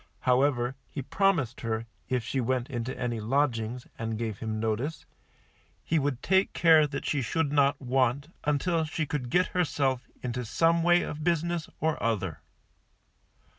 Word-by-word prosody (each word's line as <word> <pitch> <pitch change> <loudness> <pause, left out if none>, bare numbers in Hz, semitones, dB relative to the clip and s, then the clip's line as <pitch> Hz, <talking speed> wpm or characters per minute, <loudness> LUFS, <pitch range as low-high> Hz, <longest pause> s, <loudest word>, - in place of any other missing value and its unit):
However, 130 -1 +2
he 140 - -5
promised 165 - +1
her, 115 -1 -2 0.2
if 125 -2 0
she 130 +2 -1
went 125 +2 -1
into 120 +1 -4
any 120 -2 -2
lodgings, 120 0 0
and 115 -1 -2
gave 110 -3 -3
him 110 -1 -3
notice, 115 +8 -2 0.8
he 160 - +1
would 135 -3 -2
take 190 0 +3
care 160 -3 +6 0.2
she 145 - 0
should 145 +4 0
not 140 -1 +3
want, 130 +2 +1
until 160 +3 +1
she 155 +1 -2
could 135 -4 -3
get 180 +7 +2
herself 135 -7 0 0.2
into 125 0 -2
some 165 +8 +2
way 175 +1 +4
of 150 +1 -5
business 170 0 0
or 160 0 0
other. 95 -9 -1
135 Hz, 150 wpm, -28 LUFS, 120-155 Hz, 0.8 s, care